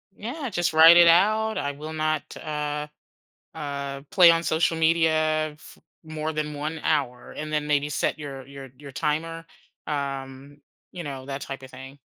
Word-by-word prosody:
Yeah, 260 +7 -5
just 175 -5 -1
write 165 +2 +9
it 170 -1 +8
out, 215 +5 +4
"I 145 - -1
will 150 +2 -8
not, 155 -1 -2
uh, 150 -1 -4 0.7
uh, 140 -2 -5
play 175 -3 +8
on 165 0 +1
social 165 0 +1
media 155 -1 +2
f 150 - -16 0.3
more 155 0 -4
than 150 0 -3
1 155 +2 -4
hour," 125 -3 -1
and 155 0 -6
then 150 -1 -1
maybe 145 0 +1
set 150 - -1
your 135 -3 -7
your 135 0 -10
your 140 0 -11
timer, 165 +4 -2 0.4
um, 140 -1 -5 0.3
you 175 - -7
know, 135 -3 -7
that 135 0 -5
type 135 -1 -7
of 130 - -11
thing, 135 +2 -11
155 Hz, 170 wpm, -25 LUFS, 140-165 Hz, 0.7 s, write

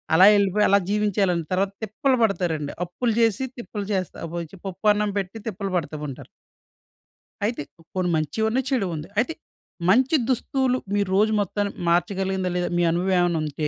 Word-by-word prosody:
అలా 185 +3 +8
వెళ్ళిపోయి 200 +1 +3
అలా 200 +1 +5
జీవించేయాలని, 200 -5 +1
తర్వాత 195 +1 +1
తిప్పలు 255 +5 +1
పడతారండి. 165 -8 0
అప్పులు 225 +7 -1
చేసి 225 +2 +2
తిప్పలు 210 -4 -6
చేస్తా 185 -2 -2
అబోయిచి 170 +2 -6
పప్పన్నం 210 +2 +1
పెట్టి 195 +3 -5
తిప్పలు 200 -2 -3
పడతా 155 -2 -3
ఉంటారు. 130 - -9 1.2
అయితే 235 -4 -1 0.3
కొన్ని 180 -1 0
మంచివి 160 +8 -1
ఉన్నాయి, 255 +3 0
చెడు 245 -9 +1
ఉంది. 155 +1 -6
అయితే 255 +8 +1 0.6
మంచి 255 +9 +4
దుస్తులు 255 0 +1 0.2
మీరు 200 -2 +1
రోజు 215 +1 +4
మొత్తాన్ని 205 0 -2 0.2
మార్చగలిగిందా 190 +1 0
లేదా? 180 - -1
మీ 175 - +2
అనుభవం 185 +3 0
ఏమన్నా 175 -2 +2
ఉంటే 150 +1 -2
195 Hz, 155 wpm, -24 LUFS, 175-215 Hz, 1.2 s, అలా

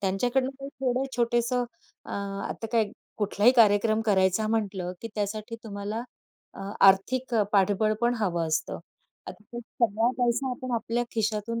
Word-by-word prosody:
त्यांच्याकडून 245 +7 +1
काही 275 - -6
थोडं 255 -1 +1
छोटंसं 240 +1 +1 0.4
अ, - - -10 0.4
आता 225 - -5
काय 220 -3 +2 0.3
कुठलाही 210 +3 +3
कार्यक्रम 215 0 +5
करायचा 190 +1 +3
म्हटलं, 195 -5 -1
की 230 - -6
त्यासाठी 215 +2 -3
तुम्हाला 205 +2 -4 0.5
अ, - - -9 0.2
आर्थिक 235 +6 +4
अ, 215 - +4
पाठबळ 205 +2 +3
पण 240 +1 +3
हवं 170 -5 0
असतं. 155 +1 -1 0.5
आता 215 - -9
तर 240 - -5 0.3
सगळा 225 +3 +1
पैसा 245 +2 +1
आपण 250 0 -5
आपल्या 235 +1 -1
खिशातून 220 +1 -1
220 Hz, 145 wpm, -27 LUFS, 205-240 Hz, 0.5 s, कार्यक्रम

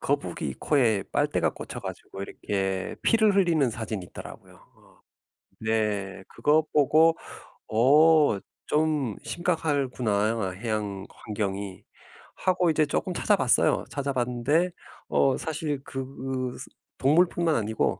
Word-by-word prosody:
거북이 - - -2
코에 115 -9 +2
빨대가 - - +1
꽂혀 - - -8
가지고 95 - -7
이렇게 95 -2 -3
피를 220 -3 +4
흘리는 165 -9 +3
사진이 110 -5 -5
있더라고요. - - -11 0.2
어 - - -24 0.6
네. 105 -4 -1
그거 155 +1 +2
보고 155 +3 +5 0.5
'어 145 +1 +5 0.3
좀 150 -7 0
심각하구나. 125 - 0
해양 105 -1 -3
환경이.' 100 -3 -5 0.5
하고 180 -2 +1
이제 155 -1 +3
쪼끔 180 +5 -2
찾아 - - +2
봤어요. - - +2
찾아 140 -1 -3
봤는데 130 +8 +1 0.4
어 135 - +3
사실 150 -3 -3
그 135 -1 -5 0.6
스 - - -8 0.3
동물뿐만 165 +3 +3
아니고 110 -1 0
130 Hz, 250 characters per minute, -26 LUFS, 105-155 Hz, 0.6 s, 보고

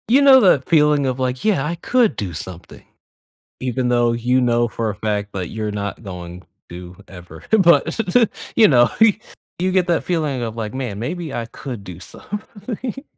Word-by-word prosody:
You 260 +5 +4
know 275 -2 +8
that 145 - +3
feeling 150 -3 +3
of 130 0 -2
like, 130 +3 -2
"Yeah, 190 -10 +2
I 165 +3 -2
could 235 +6 +1
do 95 -4 -4
something," 85 +2 -9 0.8
even 125 0 -1
though 120 -1 +2
you 120 +2 +1
know 120 -1 +2
for 115 -1 -3
a 105 - -4
fact 105 0 -3
that 95 -3 -4
you're 110 -1 -4
not 100 +2 -5
going 90 -2 -8 0.3
to 90 +1 -10
ever. 90 -1 -12
But, 190 -1 +4 0.6
you 220 -2 +7
know, 120 -4 +5
he 220 -2 +5 0.4
you 185 +1 0
get 185 -1 +2
that 170 -2 +1
feeling 155 -7 -1
of 115 -2 -4
like, 110 -2 -5
"Man, 125 -6 -4
maybe 160 +5 -4
I 115 - -3
could 120 -2 -8
do 90 -3 -10
something." 215 - -7
125 Hz, 180 wpm, -20 LUFS, 105-175 Hz, 0.8 s, know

